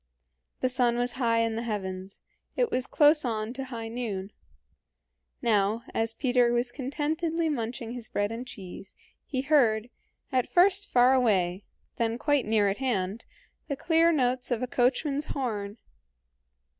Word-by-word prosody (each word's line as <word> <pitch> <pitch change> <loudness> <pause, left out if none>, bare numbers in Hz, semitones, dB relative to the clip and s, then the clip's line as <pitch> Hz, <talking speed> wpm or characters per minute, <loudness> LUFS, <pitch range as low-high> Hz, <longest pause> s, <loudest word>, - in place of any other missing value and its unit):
The 255 - +2
sun 245 -2 +2
was 245 0 0
high 230 -3 +1
in 225 -1 0
the 225 - -2
heavens; 190 -4 -5 0.3
it - - +1
was 255 0 0
close 300 0 +5
on 225 -2 -2
to 270 +1 -5
high 230 -3 -6
noon. 215 -5 -4 1.1
Now, 215 0 +2
as 225 0 0
Peter 245 -2 +2
was 240 0 0
contentedly 315 +5 -1
munching 235 -3 -3
his 240 -2 -5
bread 205 +1 -1
and 240 +3 -6
cheese, 190 -3 -9 0.3
he 260 -2 -1
heard, 245 -6 +2 0.4
at 255 -2 +1
first 385 +3 +3
far 250 +1 +5
away, 195 -7 +1 0.3
then 230 0 0
quite 290 -2 +1
near 215 -2 +3
at 195 - 0
hand, 215 -5 -2 0.4
the 280 - -2
clear 330 +3 +3
notes 255 -4 0
of 245 -1 -1
a - - -1
coachman's 275 +4 +1
horn. 215 -8 -3
245 Hz, 150 wpm, -28 LUFS, 220-270 Hz, 1.1 s, close